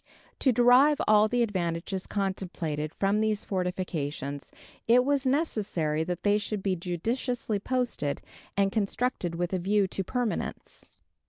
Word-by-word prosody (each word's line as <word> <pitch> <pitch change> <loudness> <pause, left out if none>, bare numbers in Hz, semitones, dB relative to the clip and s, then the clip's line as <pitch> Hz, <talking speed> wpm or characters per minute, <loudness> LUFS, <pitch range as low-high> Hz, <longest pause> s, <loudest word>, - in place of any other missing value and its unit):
To 265 - +4
derive 250 +5 +5
all 215 0 +6
the 245 +2 +2
advantages 185 -2 -2
contemplated 175 -6 -3
from 200 +2 +1
these 215 -1 0
fortifications 165 -7 -3 0.4
it 245 +2 +5
was 280 -1 +1
necessary 200 - 0
that 175 0 -4
they 205 0 +3
should 205 -1 -4
be 190 -2 +1
judiciously 215 +6 -2
posted, 245 - -1 0.4
and 195 -1 +3
constructed 205 -4 -1
with 175 +2 -2
a 185 - +1
view 200 +2 +2
to 195 - -2
permanence. 245 +3 -3
200 Hz, 135 wpm, -28 LUFS, 175-235 Hz, 0.4 s, all